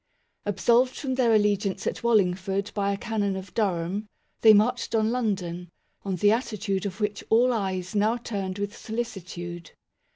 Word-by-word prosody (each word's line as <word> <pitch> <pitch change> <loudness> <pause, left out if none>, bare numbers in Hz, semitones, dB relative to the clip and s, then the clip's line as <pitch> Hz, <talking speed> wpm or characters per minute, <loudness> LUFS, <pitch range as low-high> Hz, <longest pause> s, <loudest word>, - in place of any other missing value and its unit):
Ab 205 - -2
solved 250 +2 +4
from 265 -2 -3
their 250 -3 +3
allegiance 205 -2 +1
at - - -2
Wallingford 195 -3 +1
by 200 -1 0
a 200 - -2
Canon 205 -3 -1
of 190 0 -8
Durham, 195 -1 -1 0.3
they 220 - +9
marched 225 +3 +3
on 220 0 +2
London, 185 -8 -2 0.3
on 195 -2 -2
the 205 +4 +4
attitude 210 -4 -1
of 195 +2 -8
which 210 -1 -2
all 245 +3 +4
eyes 190 -5 -2
now 215 +3 +2
turned 200 -5 -4
with 205 +1 -3
solicitude. 180 -7 -6
205 Hz, 160 wpm, -26 LUFS, 190-225 Hz, 0.3 s, they